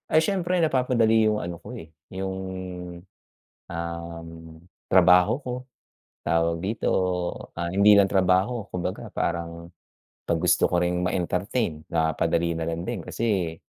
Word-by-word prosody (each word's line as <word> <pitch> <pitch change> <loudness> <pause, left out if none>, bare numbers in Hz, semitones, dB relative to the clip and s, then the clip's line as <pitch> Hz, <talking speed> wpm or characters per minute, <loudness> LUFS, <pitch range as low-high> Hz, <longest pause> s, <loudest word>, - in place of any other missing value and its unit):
Ay, 155 +1 +4
siyempre 185 0 0
napapadali 120 -6 +3
yung 105 0 +2
ano 85 -1 -6
ko, - - -9
eh, 80 0 -11 0.2
yung, 95 0 -3 1.4
um, 85 -1 -5 0.6
trabaho 90 +2 +6
ko. 125 - -3 0.7
Tawag 85 0 +1
dito, 100 +6 -2 0.7
ah, 85 0 -2
hindi 100 +2 +6
lang 100 -1 +5
trabaho, 95 +4 +2
kumbaga 90 +1 -4
parang, 85 0 -3 0.6
pag 85 -1 +1
gusto - - +4
ko - - -1
ring 90 0 0
ma-entertain 90 -1 -2
na 80 -1 +1
padali 85 +2 0
na 80 -1 -3
lang 85 0 -3
din 115 +2 -3
kasi, 95 -8 -1
90 Hz, 130 wpm, -25 LUFS, 85-110 Hz, 1.4 s, trabaho